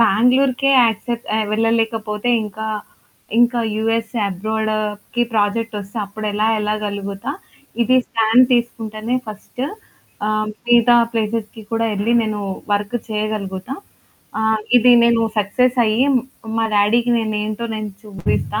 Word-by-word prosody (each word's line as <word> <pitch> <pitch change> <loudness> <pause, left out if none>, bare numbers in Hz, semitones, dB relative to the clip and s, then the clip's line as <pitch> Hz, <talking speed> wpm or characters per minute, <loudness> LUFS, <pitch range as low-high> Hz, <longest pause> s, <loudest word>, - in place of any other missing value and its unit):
బెంగుళూరుకే 250 +5 +3
accept 230 +1 -2
ఆహ్, 220 -1 0
వెళ్ళలేకపోతే 225 0 0
ఇంకా 215 +1 -6 0.7
ఇంకా 240 0 +4 0.2
యూఎస్ 225 +1 -1 0.2
అబ్రాడ్‌కి 215 +3 -2
ప్రాజెక్ట్ 220 +2 0
వస్తే 200 +2 -10
అప్పుడెలా 210 +1 -2
వెళ్ళగలుగుతా! 210 +1 -3 0.5
ఇది 255 +2 +3
స్టాండ్ 225 +3 +4
తీసుకుంటేనే 230 -1 -2
ఫస్టు 215 +4 -6 0.6
ఆహ్, 215 0 0 0.2
మిగతా 240 0 +5 0.2
ప్లేస్‌స్‌కి 220 -1 -2
కూడా 225 0 +1
వెళ్లి 205 +3 0
నేను 215 -1 -2 0.3
వర్క్ 205 +3 0
చేయగలుగుతా. 210 +1 -3 0.7
ఆహ్, 220 0 +2 0.2
ఇది 245 +1 +6
నేను 235 -1 +3 0.2
సక్సెసయ్యి 240 +2 +2 0.5
మా 225 - +2
డాడీకి 225 +4 +3
నేనేంటో 215 0 -2
నేను 215 -1 -4
చూపిస్తా 210 +1 -2
220 Hz, 105 wpm, -19 LUFS, 210-235 Hz, 0.7 s, ఇది